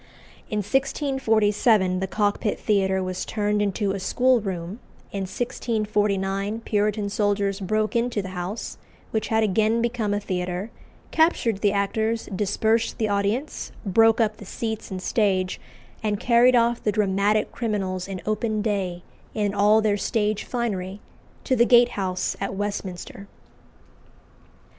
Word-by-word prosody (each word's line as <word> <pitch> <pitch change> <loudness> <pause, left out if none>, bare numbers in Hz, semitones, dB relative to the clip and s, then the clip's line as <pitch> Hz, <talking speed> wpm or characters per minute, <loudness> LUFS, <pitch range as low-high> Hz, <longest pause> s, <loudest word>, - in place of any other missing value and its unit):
In 210 -1 -1
1647 220 -6 +2
the 190 - -2
Cockpit 205 +1 0
Theatre 190 -3 +1
was 185 0 -3
turned 210 -1 0
into 200 0 0
a 195 - -3
schoolroom; 200 -4 0 0.3
in 195 -2 -4
1649 210 -2 -1
Puritan 210 -1 0
soldiers 200 -1 0
broke 215 +3 -1
into 235 -3 0
the 190 - -6
house, 185 +4 -5 0.3
which 220 - -1
had 220 0 +2
again 220 +2 +2
become 230 -3 -1
a 205 - +1
theatre, 185 +1 -3 0.4
captured 240 - +2
the 205 - +3
actors, 220 +3 -1
dispersed 220 +3 +1
the 220 -3 0
audience, 205 +8 -1
broke 225 +4 +4
up 220 -2 +1
the - - -11
seats 220 +2 -4
and 185 -2 -5
stage, 190 -4 0 0.4
and 210 -2 -1
carried 245 +1 +5
off 235 0 +2
the 210 - +1
dramatic 205 +1 +1
criminals 195 -5 -2
in 190 -2 -5
open 215 0 -1
day, 190 -5 -2 0.3
in 205 -2 0
all 210 +2 +4
their 210 -1 +2
stage 210 0 -1
finery, 200 -5 -3 0.4
to 260 - +1
the 235 - +5
Gate 240 0 +6
House 185 -4 -2
at 195 0 -2
Westminster. 200 -1 -5
210 Hz, 135 wpm, -24 LUFS, 195-225 Hz, 0.4 s, Gate